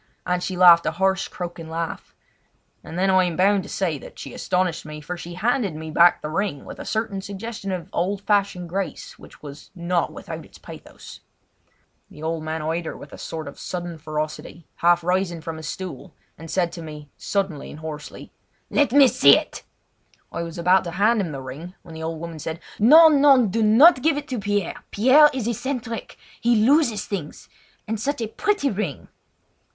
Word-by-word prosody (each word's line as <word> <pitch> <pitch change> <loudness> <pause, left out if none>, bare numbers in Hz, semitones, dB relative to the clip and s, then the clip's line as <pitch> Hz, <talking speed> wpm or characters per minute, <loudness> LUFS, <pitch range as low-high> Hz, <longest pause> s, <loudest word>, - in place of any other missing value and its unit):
and 180 0 0
she 185 0 -4
laughed 175 -2 +7
a - - 0
harsh, 190 +2 +1
croaking 175 -2 -7
laugh. 165 0 -5 0.7
And 165 - -8
then 190 +1 +2
I 185 -1 +4
am 175 -2 -2
bound 195 +2 +3
to 195 - -11
say 170 -7 -2
that - - -13
she - - -8
astonished 180 -2 -1
me, 150 0 -8
for 150 +4 -6
she 175 0 -8
handed 210 - 0
me 160 0 -7
back 170 +2 +5
the 150 - -3
ring 190 -5 -2
with - - -10
a - - -7
certain 215 -3 -2
suggestion 200 +1 -6
of 180 -3 -4
old 190 +3 -1
fashioned 200 -3 0
grace 190 +3 -5
which - - -16
was 145 0 -10
not 175 0 -1
without - - -8
its - - -17
pathos. - - -12 0.9
The 150 - -12
old 160 0 -2
man 155 0 -4
eyed 165 +2 -2
her - - -6
with 145 - -12
a - - -9
sort 160 -2 -6
of 140 - -10
sudden 175 -2 -5
ferocity, 155 +2 -5
half 175 0 +3
rising 180 -1 0
from 160 0 -6
his 160 -1 -7
stool, 175 -6 -7 0.2
and 165 +1 -11
said 175 -1 0
to 170 - -8
me 150 -2 -10
suddenly 190 -8 -3
and - - -10
hoarsely: 150 -2 -8 0.4
"Let 290 -4 +2
me 275 0 +7
see!" 140 - +6 0.9
I - - -4
was 170 +1 -6
about 180 +2 +3
to 170 - -4
hand 215 +2 +3
the 135 -2 -6
ring 155 +8 -9
when 165 - -12
the 160 - -8
old 160 0 -4
woman 165 -1 -7
said: 160 +2 -5 0.2
"No! 310 +10 +8
no, 280 -4 +5
do 220 +3 -1
not 255 +8 +6
give 310 0 +2
it 290 0 -5
to 255 -3 -2
Pierre! 205 -2 -2
Pierre 265 +8 +6
is 260 -5 -3
eccentric. 240 -1 -4 0.2
He 240 0 +3
loses 230 -2 +3
things; 175 -8 -6 0.4
and 220 0 -2
such 280 +5 -2
a 225 - -2
pretty 340 - 0
ring!" 190 -9 -4
180 Hz, 195 wpm, -23 LUFS, 165-215 Hz, 0.9 s, No